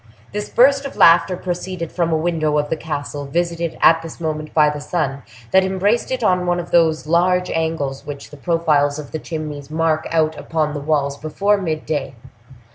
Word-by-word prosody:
This 210 +1 -4
burst 275 +3 +4
of 275 - -7
laughter 170 +2 +5
proceeded 180 -1 -4
from 170 -2 0
a 160 - +2
window 155 -2 0
of 145 0 -1
the - - +2
castle, 145 -2 -5
visited 170 +2 -2
at 165 0 +6
this 165 0 -9
moment 155 -2 -3
by 155 -1 +4
the 150 0 -6
sun, 140 -3 -2 0.3
that 190 0 +5
embraced 190 +5 0
it 260 -2 -2
in 180 -3 +2
one 175 0 +1
of 175 - -7
those 160 -3 +3
large 180 +3 +2
angles 160 -4 -2
which 140 -1 -8
the 150 - -11
profiles 150 -3 +1
of 150 -2 -8
the 160 - -4
chimneys 150 -3 -6
mark 160 0 0
out 160 -1 +1
upon 155 -2 -1
the 145 - -3
walls 140 -1 0
before 195 +8 +1
mid 160 -5 -3
day. 145 -4 -3
160 Hz, 195 wpm, -20 LUFS, 150-175 Hz, 0.3 s, at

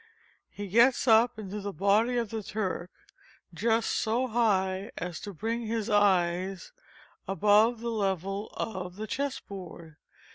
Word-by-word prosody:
He 205 0 -7
gets 235 +7 +4
up 225 0 +5
into 210 -1 -6
the 200 0 -4
body 205 +7 +2
of 230 -3 -2
the 225 -1 -3
Turk 190 -4 -3 0.6
just 225 0 +1
so 235 +4 0
high 200 -5 +1
as 175 -1 -4
to 205 - -7
bring 225 +5 -3
his 220 0 -2
eyes 185 -2 +2 0.6
above 210 +4 +3
the 235 0 -2
level 195 -1 -2
of 185 -4 -4
the 215 +2 -5
chess 270 +5 -2
board. 170 -5 -10
205 Hz, 140 wpm, -29 LUFS, 190-225 Hz, 0.6 s, up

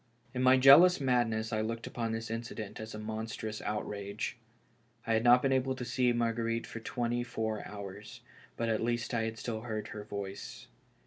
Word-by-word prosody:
In 125 - -2
my 130 +1 +6
jealous 140 +8 +8
madness 120 -4 +1
I 110 - +1
looked 115 +1 -3
upon 115 -2 -3
this 115 0 -4
incident 115 -2 -5
as 110 0 -7
a - - -5
monstrous 110 0 -5
outrage. 105 -1 -3 0.7
I 115 - +1
had 110 0 +2
not 120 +1 +6
been 135 - +2
able 130 0 +1
to 125 - -5
see 125 0 +2
Mar 120 -1 +1
guerite 115 0 -1
for 115 - -7
twenty 120 +1 -2
four 110 -3 -3
hours, 100 +1 -9 0.4
but 115 - -1
at 110 -1 +1
least 120 0 -1
I 115 -1 +1
had 115 0 -4
still 110 -1 -4
heard 110 -2 -4
her 105 - -6
voice. 100 -1 -6
115 Hz, 190 wpm, -32 LUFS, 110-120 Hz, 0.7 s, jealous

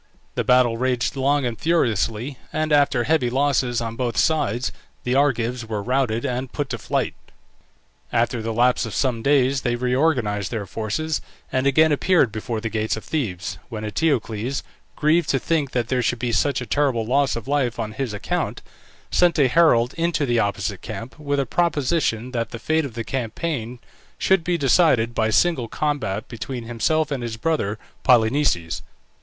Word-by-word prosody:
The - - -1
battle 125 -2 +4
raged 125 +2 0
long 140 +1 +1
and 120 -2 -3
furiously, 125 - 0
and 155 -1 0
after 140 -4 +3
heavy 150 -3 +2
losses 130 -2 +1
on 115 -1 -4
both 120 -1 -2
sides 130 -7 +1 0.3
the 125 - 0
Argives 125 -3 +1
were 110 -2 -4
routed 125 -2 0
and 125 +1 -3
put 145 -3 -3
to 115 - -3
flight. 110 - -1 1.0
After 120 0 +1
the 115 +1 -3
lapse 125 +1 +2
of 110 - -6
some 125 -4 0
days 135 0 +3
they 120 -2 0
reorganized 125 -5 +1
their 110 -4 -3
forces, 115 +11 -2 0.3
and 130 +1 +1
again 155 +3 +4
appeared 150 - +3
before 110 +1 -3
the 110 - -3
gates 110 0 -1
of 110 - -7
Thebes, 105 - -3
when 110 -3 -5
Eteocles, 120 -1 -1 0.3
grieved 155 +2 +2
to 135 - +3
think 150 0 0
that 120 -1 -1
there 130 -1 +1
should 120 +1 0
be 120 0 -2
such 135 +3 +1
a - - -4
terrible 130 -5 +1
loss 135 +3 +2
of 115 0 -6
life 135 -5 0
on 110 -2 -3
his 120 +2 -3
account, 105 - -3 0.5
sent 175 -1 +3
a 140 -3 +5
herald 125 -4 +4
into 170 -3 +1
the 120 -2 +1
opposite 100 -1 -1
camp, 115 +7 -7
with 145 -1 -1
a 135 - +1
proposition 145 -6 0
that 115 -2 -2
the - - -6
fate 155 +5 0
of 125 -5 -8
the 115 - -3
campaign 125 0 -3 0.4
should 190 -3 +2
be 175 0 0
decided 135 -6 +3
by 110 -1 +1
single 130 +1 +2
combat 130 -6 -2
between 120 +2 -6
himself 145 +7 0
and 135 -3 -2
his 115 -2 -4
brother 115 -8 -1 0.3
Polynices. 115 - +2
125 Hz, 175 wpm, -22 LUFS, 115-145 Hz, 1.0 s, a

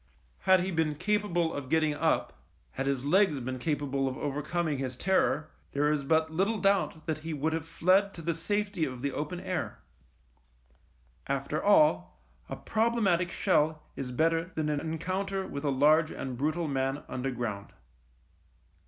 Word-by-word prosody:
Had 185 -1 +7
he 190 +2 -2
been 160 -3 0
capable 180 -2 0
of 140 -2 -5
getting 155 -1 +2
up, 145 - 0 0.4
had 135 - -3
his 135 -1 -1
legs 180 -2 +3
been 130 +1 -4
capable 140 -1 -1
of 130 - -3
overcoming 150 +1 -2
his 130 -2 -4
terror, 160 -3 +1 0.2
there 145 +1 +2
is 150 -2 0
but 160 +2 +2
little 195 +7 +1
doubt 195 -4 +1
that 155 -2 -2
he 160 0 -4
would 155 +3 -1
have 160 -1 -3
fled 190 +5 +3
to 165 - -8
the 170 +1 0
safety 200 +2 -1
of 130 -4 -3
the 140 +1 -1
open 150 +6 -4
air. 180 -3 -3 1.5
After 140 +3 -2
all, 90 - +4 0.3
a - - -4
problematic 215 -6 +1
shell 155 -1 +1
is 125 -2 -5
better 165 +5 +2
than 155 -1 -1
an 150 -1 0
encounter 185 +5 -2
with 140 +1 -6
a 145 - +1
large 150 +4 +4
and 130 -5 -5
brutal 155 +6 -1
man 135 0 -1
underground. 120 -6 -4
155 Hz, 160 wpm, -29 LUFS, 140-175 Hz, 1.5 s, Had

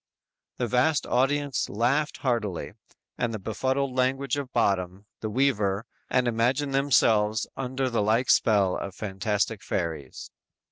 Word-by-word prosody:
"_ - - -58
The 125 - 0
vast 125 +6 +2
audience 140 +2 0
laughed 130 +8 0
heartily 110 -8 -1 0.5
at 120 - 0
the - - -2
befuddled 130 +6 -1
language 135 +2 +1
of 140 -3 -5
Bottom, 95 -3 0
the 110 - -4
weaver, 105 -5 +1 0.2
and 125 -1 +2
imagined 125 +5 +1
themselves 110 -6 +3
under 130 0 -2
the 120 -4 0
like 110 +4 +2
spell 100 -4 +3
of 100 - -6
fantastic 105 +1 -2
fairies. 80 -7 -4
120 Hz, 135 wpm, -26 LUFS, 105-135 Hz, 0.5 s, themselves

